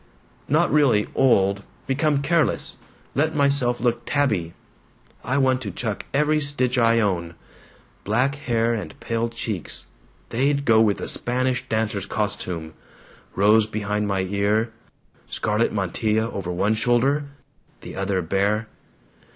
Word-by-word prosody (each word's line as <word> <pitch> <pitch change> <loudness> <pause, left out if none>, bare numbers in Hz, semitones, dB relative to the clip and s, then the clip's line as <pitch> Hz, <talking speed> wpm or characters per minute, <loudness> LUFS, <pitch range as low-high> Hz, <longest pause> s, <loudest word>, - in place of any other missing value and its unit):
"Not - - +2
really 135 -8 +4
old. 100 -6 +3 0.2
Become 140 +1 +1
careless. 165 +2 +1 0.4
Let 155 +3 +1
myself 140 -4 +2
look 120 0 0
tabby. 105 - 0 0.7
"I 125 +3 0
want 130 -2 +2
to 105 - -4
chuck 105 +2 -4
every 150 +2 +2
stitch 140 -4 0
I 115 0 +4
own. 85 -6 -1 0.7
Black 125 +7 +1
hair 120 -4 0
and 105 -4 -6
pale 115 0 -1
cheeks 110 -5 -4 0.4
they'd 140 +4 +1
go 110 -1 +5
with 105 -3 +2
a - - -4
Spanish 125 +1 -1
dancer's 110 -3 -1
costume 90 -7 -3 0.6
rose 105 +2 +4
behind 105 -1 -2
my 95 -1 0
ear, 100 +4 0 0.5
scarlet 105 +2 0
mantilla 110 +3 0
over 90 -3 -4
one 100 +5 +1
shoulder, 125 +6 +2 0.6
the - - -9
other 95 -1 -1
bare." 100 +5 0
115 Hz, 125 wpm, -23 LUFS, 100-130 Hz, 0.7 s, go